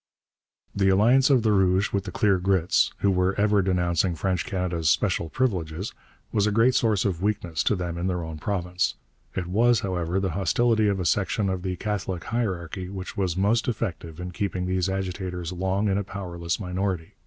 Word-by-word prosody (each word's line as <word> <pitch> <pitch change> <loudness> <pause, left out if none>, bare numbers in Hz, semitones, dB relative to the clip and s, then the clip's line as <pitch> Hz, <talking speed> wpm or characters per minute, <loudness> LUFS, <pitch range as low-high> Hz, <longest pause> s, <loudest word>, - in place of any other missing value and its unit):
The 95 -1 +3
alliance 120 +8 +5
of 130 -5 +4
the 110 - +3
Rouges 95 -1 +2
with 100 -1 0
the 90 - -5
'Clear 100 -2 +2
Grits,' 90 -2 +2
who 100 - +3
were 95 +1 +1
ever 105 -1 +3
denouncing 90 -1 +1
French 90 0 -1
Canada's 90 -4 -1
'special 85 -2 +1
privileges,' 90 -7 -2 0.4
was 105 -2 +2
a - - +1
great 115 +5 +4
source 110 -5 +2
of 90 -4 -1
weakness 95 -6 -1
to - - +3
them 85 -2 -4
in 90 - -1
their 90 -2 -1
own 80 -1 -7
province. 90 -1 -1 0.4
It 90 - -2
was, 115 +6 +3
however, 90 -1 -1
the 95 -2 -1
hostility 110 +5 +2
of 100 -1 +1
a 90 - -2
section 100 +2 +1
of 95 -1 -2
the 90 0 -2
Catholic 95 -3 -3
hierarchy 95 -6 -3
which 95 -1 -7
was 95 -3 -1
most 105 +4 +2
effective 85 -8 -3
in 90 0 -5
keeping 90 -1 -2
these 95 0 0
agitators 90 -2 -3
long 95 +3 0
in 100 0 +1
a - - -2
powerless 85 -3 -4
minority. 90 -3 -3
95 Hz, 190 wpm, -25 LUFS, 90-100 Hz, 0.4 s, alliance